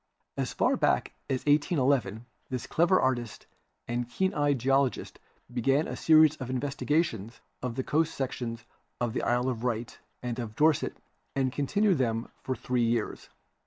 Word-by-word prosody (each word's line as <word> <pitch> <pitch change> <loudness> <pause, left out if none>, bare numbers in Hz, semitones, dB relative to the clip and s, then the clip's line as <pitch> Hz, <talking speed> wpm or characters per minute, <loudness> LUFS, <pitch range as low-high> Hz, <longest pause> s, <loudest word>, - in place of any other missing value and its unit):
As - - -2
far - - +2
back - - +1 0.2
as 130 -1 -1
181 145 -1 +3
1 110 +4 -9 0.2
this 125 -2 -3
clever 175 +3 +3
artist 120 -4 -1 0.4
and 120 0 -2
keen 190 +9 0
eyed 145 -3 +2
geologist 135 +1 0 0.3
began 135 +5 +2
a - - -4
series 155 -1 +5
of 130 -2 -6
investigations 135 - -1 0.2
of 125 -2 -3
the 130 - -1
coast 160 +4 +1
sections 120 -3 -4 0.3
of 120 -2 -1
the - - -1
Isle 125 +1 +1
of 120 -4 -2
Wight 120 -1 -3 0.2
and 125 0 -3
of 110 -3 -5
Dorset 155 +2 +2 0.4
and 135 -2 +1
continued 190 +4 +2
them 115 -2 0
for 130 - -2
three 125 -1 -1
years. 115 -1 -1
130 Hz, 160 wpm, -29 LUFS, 120-145 Hz, 0.4 s, series